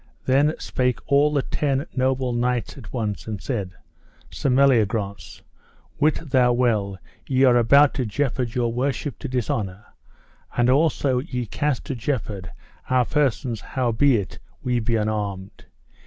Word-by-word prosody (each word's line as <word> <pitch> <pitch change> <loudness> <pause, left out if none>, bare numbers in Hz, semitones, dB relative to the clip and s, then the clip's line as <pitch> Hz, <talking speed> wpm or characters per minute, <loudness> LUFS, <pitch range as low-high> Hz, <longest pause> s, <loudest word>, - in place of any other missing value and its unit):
Then 145 +4 +3
spake 125 -1 -1
all 145 +2 +5
the 140 -3 +1
ten 140 -1 -1
noble 130 -1 0
knights 120 -2 -1
at 135 - -11
once 110 -5 -3
and 105 -3 -4
said: 100 -6 -3 0.6
Sir - - -2
Meliagrance, 115 -7 +1 0.6
wit 155 0 +1
thou 125 -2 +4
well 110 -6 +1 0.3
ye 130 0 +2
are 125 -2 +6
about 140 +5 +5
to 130 - -2
jeopard 120 +1 -2
your 120 -2 0
worship 130 0 -2
to - - -5
dishonour, 110 -6 -2 0.7
and 120 +1 +4
also 140 -3 +2
ye 125 -3 -4
cast 140 +4 -2
to - - -3
jeopard 110 -7 -3 0.4
our 130 -1 +3
persons 130 -6 0
howbeit 120 -3 0 0.2
we 125 -1 +1
be 115 +1 0
unarmed. 105 -3 -3
125 Hz, 140 wpm, -23 LUFS, 110-135 Hz, 0.7 s, are